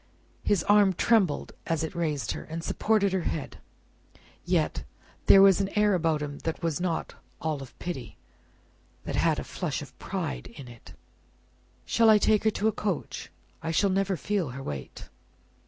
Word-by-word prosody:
His 200 -5 +1
arm 205 -2 +5
trembled 190 -5 +2 0.2
as 165 -1 0
it 160 - -4
raised 150 - -1
her, - - -5
and 165 +1 -6
supported 205 -1 +1
her 190 - +1
head. 155 -3 -4 0.9
Yet, - - 0 0.4
there 195 - +9
was 195 0 +6
an 195 - -1
air 210 -1 +4
about 160 -4 +1
him 145 -1 -6
that 165 +1 -4
was 165 0 -1
not 175 -3 -2 0.3
all 155 -3 -2
of 135 - -11
pity 165 -9 -6 0.9
that - - -4
had - - +2
a - - -3
flush - - -3
of - - -14
pride 60 -1 -4
in 125 +2 -11
it. 120 -2 -13 0.9
"Shall 230 -1 +4
I 215 - +8
take 215 +1 +2
her - - +6
to 215 0 -1
a - - +3
coach? 200 -5 -4 0.3
I 160 - -4
shall 190 +4 +2
never 195 0 0
feel 190 -2 -1
her 135 +2 -7
weight." 70 - -7
175 Hz, 170 wpm, -27 LUFS, 150-200 Hz, 0.9 s, there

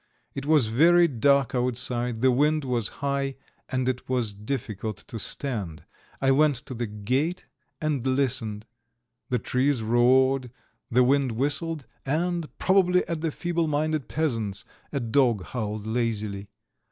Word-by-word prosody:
It 140 +1 -5
was 150 -5 +5
very 170 +10 +5
dark 140 -1 +2
outside, 125 -1 -1
the 130 0 +5
wind 150 +4 +2
was 120 -5 0 0.2
high, 140 -1 -1 0.3
and 130 -1 -1
it 130 0 -2
was 120 -5 0
difficult 110 -2 -4
to 115 - -5
stand. 105 - -3 0.4
I 135 0 +3
went 145 +1 +4
to 130 - -7
the 120 -1 -3
gate 130 - -1 0.3
and 145 -5 -1
listened, 115 -5 -1 0.6
the 125 - +1
trees 130 +1 0
roared, 125 +3 +3 0.4
the 125 +2 +4
wind 135 -1 +2
whistled 145 +4 -1 0.2
and, 170 +3 -1
probably 180 -1 +3
at 165 -2 -3
the 165 - 0
feeble 170 +1 -1
minded 155 -1 -1
peasant's, 115 -11 -2 0.3
a 140 - -1
dog 120 -4 +2
howled 110 -3 -4
lazily. 110 -3 -2
130 Hz, 140 wpm, -26 LUFS, 115-150 Hz, 0.6 s, was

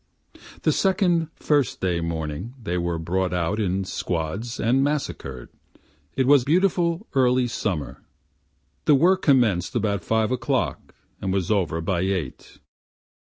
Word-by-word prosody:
The - - +3
second 180 -4 +2
First 145 -4 +1
day 90 -2 0
morning 85 - -4
they 100 -7 -3
were 85 -1 -1
brought 90 +3 -1
out 90 +5 -1
in 95 -2 0
squads 90 +7 -3
and 125 +4 +2
massacred, 135 - -3 0.7
it 130 - +2
was 140 -1 +5
beautiful 175 - +1
early 130 -2 +3
summer, 100 - -3 0.8
The 150 - +6
work 185 +7 +4
commenced 120 - +2
about 100 -5 0
five 110 +4 +1
o'clock 130 -1 -2 0.3
and 95 - -1
was 95 0 -1
over 85 -5 0
by 85 +1 -1
eight. 90 -7 -3
110 Hz, 130 wpm, -24 LUFS, 90-135 Hz, 0.8 s, The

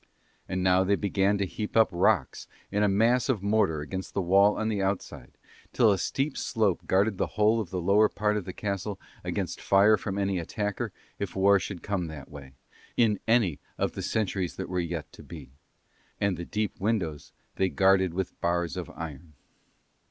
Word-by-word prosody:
And 95 0 -1
now 95 0 +4
they 100 +2 +2
began 100 0 +1
to 100 - 0
heap 105 +5 -4
up 110 - +6
rocks 90 -4 +1 0.2
in 105 +1 0
a 105 - +4
mass 115 +6 +2
of 110 -7 0
mortar 100 -7 +2
against 95 +5 -6
the - - +1
wall 100 +4 +4
on 110 - -1
the 105 -3 -1
outside, 95 0 -4 0.4
till 110 -3 +5
a 95 - +1
steep 135 - -1
slope 110 -6 0
guarded 100 +1 +2
the - - +1
whole 110 +2 +4
of 100 - -6
the 90 - -3
lower 100 +4 +4
part 105 +1 0
of 105 -4 -2
the 95 - -5
castle 100 +1 -4 0.2
against - - -3
fire 100 +2 +5
from 100 -2 -4
any 100 -2 0
attacker 105 +4 -3 0.3
if 100 -3 -4
war 100 +1 +5
should 95 -2 -6
come 95 -4 -2
that 75 -2 -9
way, 70 -2 -11 0.4
in 110 -4 +3
any 110 -10 +2 0.2
of - - 0
the - - -6
centuries 95 -4 -1
that 95 - -5
were 90 0 -1
yet 85 -3 -4
to - - -13
be: 75 -6 -11 0.7
and 100 -2 +1
the 85 +1 -6
deep 105 +2 -3
windows 95 -8 -2 0.3
they 95 - +2
guarded 95 -1 +3
with 95 -1 -4
bars 85 -1 0
of - - -5
iron. 80 0 -8
95 Hz, 190 wpm, -27 LUFS, 90-105 Hz, 0.7 s, up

